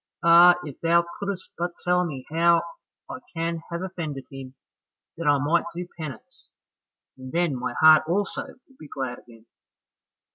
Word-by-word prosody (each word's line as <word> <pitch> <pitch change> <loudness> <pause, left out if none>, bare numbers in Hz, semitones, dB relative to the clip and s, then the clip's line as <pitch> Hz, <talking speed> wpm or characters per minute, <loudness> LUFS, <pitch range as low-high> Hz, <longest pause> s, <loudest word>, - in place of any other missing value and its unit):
Ah, 170 +1 +7
if 145 -3 -10
thou 170 +1 +3
couldst 200 -2 -5
but 175 0 -2
tell 180 0 +2
me 135 -7 -6
how 170 +1 +3 0.4
I 255 - -7 0.2
can 165 0 -2
have 170 +1 -4
offended 160 -8 -5
him, 135 -1 -10 0.6
that 165 -2 -4
I 145 -1 +5
might 145 +5 +1
do 175 0 -5
penance, 155 -5 -10 0.7
and 130 0 -9
then 170 -4 0
my 125 0 -4
heart 155 0 +7
also 195 +4 -2 0.2
would 265 - -24
be 155 - -11
glad 130 -3 -5
again." 115 -2 -18
165 Hz, 155 wpm, -25 LUFS, 140-175 Hz, 0.7 s, Ah